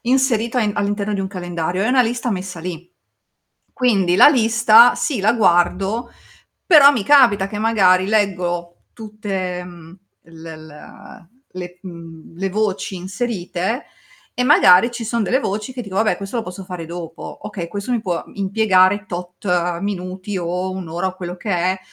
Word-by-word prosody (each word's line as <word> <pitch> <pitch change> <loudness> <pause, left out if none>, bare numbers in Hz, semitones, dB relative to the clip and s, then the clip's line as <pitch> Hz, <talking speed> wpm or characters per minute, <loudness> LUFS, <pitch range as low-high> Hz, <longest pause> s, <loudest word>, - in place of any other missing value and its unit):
inserito 250 -3 +1
a - - +2
in 210 -1 0
all'interno 205 0 -1
di 195 - -2
un 190 - -2
calendario, 175 -1 -3
è 220 - 0
una 255 0 +4
lista 240 +1 -2
messa 185 -3 -5
lì. 175 0 -7 0.9
Quindi 200 -9 +1
la - - +8
lista, 230 -3 +5
sì 275 -9 -2
la 215 +3 +3
guardo, 195 +2 +1 0.6
però 295 -6 +8
mi 235 - -2
capita 235 -7 +4
che 210 - -7
magari 195 -5 +3
leggo 175 -5 -1
tutte, 195 -5 -5
mhmm, 175 -1 -13 0.3
l 165 0 -15
l 160 -1 -10
ehm, 165 +3 -15 0.3
le 180 -1 -8
mhmm, 165 -3 -12
le 195 - -1
voci 205 -1 -2
inserite, 195 +3 -4 0.5
e 250 - -1
magari 245 - +6
ci 235 - -6
son 230 +1 -1
delle 260 +6 +1
voci 210 +2 -4
che 250 -1 -6
dico: 195 -3 -8
"Vabbè, 220 +1 +2
questo 200 +4 -6
lo 230 - -1
posso 180 +2 -8
fare 180 -3 -7
dopo. 165 -1 -8
Okay, 195 -5 -6
questo 200 +6 -6
mi 240 - 0
può, 180 -5 -3
mhmm, - - -18
impiegare 200 0 +2
tot 175 -1 -3
minuti 190 0 -4
o 180 +2 -3
1 185 -1 -6
ora 175 +3 -2
o 185 - -9
quello 180 -1 -6
che 205 - -6
è, 185 +1 0
195 Hz, 170 wpm, -19 LUFS, 180-220 Hz, 0.9 s, la